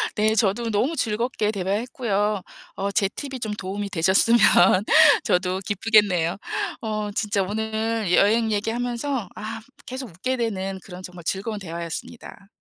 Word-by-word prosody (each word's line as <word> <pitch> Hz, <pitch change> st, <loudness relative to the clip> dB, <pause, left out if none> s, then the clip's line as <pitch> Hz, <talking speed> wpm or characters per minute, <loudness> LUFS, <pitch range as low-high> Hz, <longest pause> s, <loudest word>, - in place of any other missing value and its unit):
네, 215 Hz, +1 st, +2 dB
저도 220 Hz, +2 st, +1 dB
너무 260 Hz, +11 st, 0 dB
즐겁게 225 Hz, -2 st, -1 dB
대화했고요. 210 Hz, +1 st, -1 dB, 0.3 s
어 200 Hz, +1 st, -2 dB
제 200 Hz, -4 st, +4 dB
팁이 270 Hz, +2 st, -6 dB
좀 220 Hz, -3 st, -3 dB
도움이 200 Hz, 0 st, -5 dB
되셨으면 195 Hz, +6 st, +4 dB, 0.8 s
저도 180 Hz, +1 st, 0 dB
기쁘겠네요. 200 Hz, -5 st, +2 dB, 0.4 s
어 215 Hz, -2 st, -3 dB
진짜 205 Hz, -2 st, 0 dB
오늘 220 Hz, 0 st, -2 dB
여행 220 Hz, +4 st, +3 dB
얘기하면서 235 Hz, +2 st, -2 dB
아 220 Hz, +1 st, -6 dB, 0.2 s
계속 255 Hz, -2 st, -6 dB
웃게 230 Hz, +10 st, -3 dB
되는 195 Hz, -4 st, -3 dB
그런 180 Hz, -1 st, -10 dB
정말 180 Hz, -2 st, -10 dB
즐거운 205 Hz, +4 st, -2 dB
대화였습니다. 170 Hz, +4 st, -7 dB
210 Hz, 305 characters per minute, -23 LUFS, 195-230 Hz, 0.8 s, 제